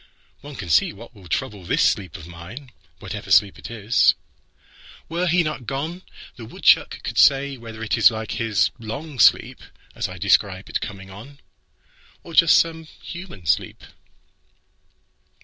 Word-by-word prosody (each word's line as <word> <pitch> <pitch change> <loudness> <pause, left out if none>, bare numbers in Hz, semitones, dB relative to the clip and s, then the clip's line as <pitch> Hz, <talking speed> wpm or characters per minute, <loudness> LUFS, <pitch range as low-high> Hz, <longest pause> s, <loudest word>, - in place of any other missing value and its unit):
One 145 +1 -11
can 90 - -7
see 80 - +3
what 115 +5 -13
will 95 -5 -15
troubleThis 90 +2 -2
sleep 90 -6 0
of 80 - -12
mine, 90 +11 -11 0.3
whatever - - -8
sleep 100 -2 +4
it - - -9
is. 115 0 +2 0.9
Were 175 +2 -2
he 175 +1 +3
not 155 -6 -5
gone, 155 +7 -4 0.4
The 115 - -9
woodchuck 110 - +2
could - - -2
say 140 0 +4
whether 115 -2 -9
it's 110 +1 +4
like 110 -1 -6
hisLong 115 - -2
sleep, - - +4 0.3
as - - -3
I - - -9
describe - - +1
its - - -1
coming 95 -2 -8
on, 130 +9 -12 0.8
Or 170 - -11
just 165 +1 +6
some 160 -1 0
human 170 - -11
sleep. 75 - -1
115 Hz, 145 wpm, -22 LUFS, 100-145 Hz, 0.9 s, just